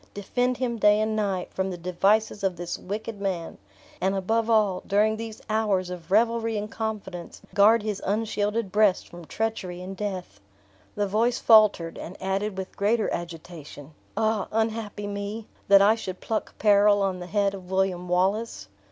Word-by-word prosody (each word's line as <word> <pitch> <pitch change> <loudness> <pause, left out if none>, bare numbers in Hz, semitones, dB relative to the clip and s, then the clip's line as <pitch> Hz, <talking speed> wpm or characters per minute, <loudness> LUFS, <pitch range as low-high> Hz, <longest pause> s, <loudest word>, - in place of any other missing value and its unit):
Defend 245 +5 -1
him 245 -2 -2
day 210 0 +4
and 215 0 0
night, 195 -4 -2
from 190 0 -1
the 180 - -5
devices 200 +5 +1
of 190 -2 +1
this 175 0 -4
wicked 210 +2 -6
man; 180 -4 -3 0.4
and, 190 +2 +1
above 225 +4 0
all, 210 -5 +3
during 215 +2 +3
these 220 -1 -8
hours 210 -4 0
of 170 -2 -8
revelry 225 +2 +2
and 210 +1 -4
confidence, 205 -6 -5
guard 210 +2 +5
his 210 -2 -3
unshielded 210 0 -1
breast 210 -2 +3
from 175 -1 -11
treachery 205 -3 -3
and 185 +2 -7
death." 185 - -5 0.6
The 205 - 0
voice 225 +5 +1
faltered, 210 -7 +4
and 180 - -8
added 195 +1 -2
with 190 0 -6
greater 215 +2 +1
agitation, 165 -3 -8 0.3
"Ah, 220 -2 +1
unhappy 220 -2 -2
me, 205 +2 -5 0.2
that 200 0 +7
I 210 +2 +6
should 190 -5 -6
pluck 220 - -3
peril 205 -1 +4
on 190 -2 -1
the 180 - -7
head 200 +1 +1
of 185 -2 -9
William 190 -2 0
Wallace!" 185 - 0
205 Hz, 165 wpm, -26 LUFS, 185-220 Hz, 0.6 s, that